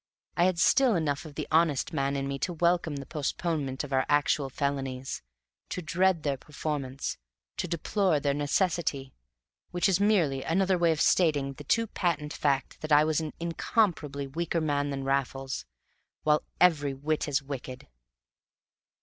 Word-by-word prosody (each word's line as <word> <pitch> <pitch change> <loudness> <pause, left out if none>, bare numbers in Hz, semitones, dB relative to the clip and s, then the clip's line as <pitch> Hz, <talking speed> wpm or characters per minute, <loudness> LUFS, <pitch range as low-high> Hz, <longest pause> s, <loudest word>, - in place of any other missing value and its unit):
I 175 - +4
had 185 -2 +2
still 245 +6 +4
enough 150 -3 -1
of 150 -2 -10
the - - -4
honest 160 -3 +2
man 140 0 0
in 135 0 -2
me 140 0 -3
to 175 - -2
welcome 170 -2 +1
the 140 -1 -6
postponement 150 -2 -2
of 145 -2 -6
our 130 0 +3
actual 145 -1 +2
felonies, 135 -1 -3 0.5
to 180 - -4
dread 180 0 +2
their 140 -2 0
performance, 140 -2 -4 0.4
to - - -2
deplore 175 0 +1
their 140 0 +1
necessity: 145 -2 0 0.6
which 175 +2 +1
is 190 -1 +2
merely 180 -10 +2
another 190 +5 +2
way 170 -2 +3
of 160 -1 -1
stating 145 -7 +3
the 145 - -10
too 230 +10 +2
patent 165 -7 -2
fact 140 -3 -1
that 155 - -5
I 150 0 +7
was 155 0 +1
an 155 -1 -5
incomparably 165 -4 0
weaker 165 +5 -2
man 145 -2 0
than 135 -1 -3
Raffles, 135 0 -2 0.6
while 150 0 +3 0.2
every 145 -6 +3
whit 155 +4 -1
as 145 -1 0
wicked. 130 -2 -7
150 Hz, 160 wpm, -28 LUFS, 140-170 Hz, 0.6 s, I